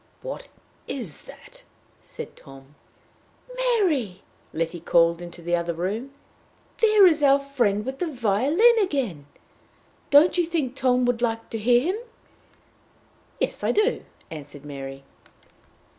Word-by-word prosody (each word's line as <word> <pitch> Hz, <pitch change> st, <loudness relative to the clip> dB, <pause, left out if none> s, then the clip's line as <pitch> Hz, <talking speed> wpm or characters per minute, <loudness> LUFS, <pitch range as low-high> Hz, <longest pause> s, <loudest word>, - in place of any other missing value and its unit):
"What -, -, -6 dB, 0.4 s
is 220 Hz, -, -5 dB
that?" -, -, -14 dB, 0.4 s
said -, -, -9 dB
Tom. 135 Hz, +1 st, -15 dB, 0.8 s
"Mary!" 355 Hz, -, 0 dB, 0.3 s
Letty 165 Hz, +2 st, -3 dB
called 170 Hz, 0 st, +3 dB
into 175 Hz, 0 st, -9 dB
the 175 Hz, +1 st, +1 dB
other 170 Hz, -1 st, -2 dB
room, 210 Hz, +10 st, -3 dB, 0.7 s
"there 430 Hz, -3 st, +6 dB
is 320 Hz, -4 st, +4 dB
our 280 Hz, -1 st, +5 dB
friend 240 Hz, -7 st, 0 dB
with 265 Hz, +1 st, -5 dB
the 360 Hz, -, -1 dB
violin 280 Hz, -, +3 dB
again! 245 Hz, -, -2 dB, 0.8 s
Don't 315 Hz, +5 st, +5 dB
you 345 Hz, -, +2 dB
think 300 Hz, -7 st, -2 dB
Tom 250 Hz, -1 st, +2 dB
would 245 Hz, -1 st, 0 dB
like 225 Hz, -1 st, -2 dB
to 225 Hz, -, -3 dB
hear 240 Hz, +3 st, +4 dB
him?" 435 Hz, -, -6 dB, 1.4 s
"Yes, -, -, -2 dB
I -, -, +2 dB
do," 425 Hz, +4 st, +1 dB, 0.3 s
answered 145 Hz, -2 st, -10 dB
Mary. 135 Hz, -1 st, -8 dB
240 Hz, 130 wpm, -24 LUFS, -, 1.4 s, there